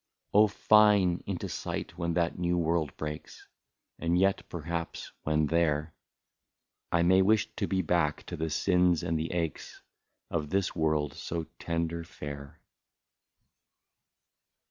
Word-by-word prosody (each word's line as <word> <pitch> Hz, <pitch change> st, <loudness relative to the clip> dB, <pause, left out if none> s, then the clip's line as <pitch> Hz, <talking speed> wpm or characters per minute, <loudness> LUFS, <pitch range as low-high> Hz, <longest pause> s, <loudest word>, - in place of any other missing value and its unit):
Oh! 105 Hz, +1 st, +7 dB
fine! 105 Hz, -3 st, +4 dB
— -, -, -40 dB
into 95 Hz, -3 st, -3 dB
sight -, -, -5 dB
when 85 Hz, -1 st, -2 dB
that 85 Hz, 0 st, 0 dB
new 90 Hz, 0 st, +1 dB
world 85 Hz, -3 st, 0 dB
breaks, 75 Hz, 0 st, -7 dB, 0.5 s
And 85 Hz, +1 st, +1 dB
yet 95 Hz, +1 st, +3 dB
perhaps 85 Hz, 0 st, -5 dB
when 75 Hz, 0 st, +1 dB
there, 75 Hz, -1 st, +1 dB, 1.0 s
I 85 Hz, 0 st, +3 dB
may 95 Hz, +2 st, +5 dB
wish 110 Hz, +3 st, +2 dB
to -, -, -1 dB
be 95 Hz, -1 st, 0 dB
back 80 Hz, -3 st, +1 dB
to -, -, -6 dB
the 80 Hz, +1 st, -2 dB
sins 90 Hz, 0 st, +2 dB
and 85 Hz, -2 st, -1 dB
the 80 Hz, -, -3 dB
aches 85 Hz, -3 st, -4 dB, 0.5 s
Of 75 Hz, -3 st, -2 dB
this 95 Hz, +1 st, 0 dB
world 75 Hz, -4 st, 0 dB
so 85 Hz, -1 st, -4 dB, 0.2 s
tender 85 Hz, 0 st, -2 dB
fair. 70 Hz, -3 st, -8 dB
85 Hz, 135 wpm, -29 LUFS, 80-90 Hz, 1.0 s, Oh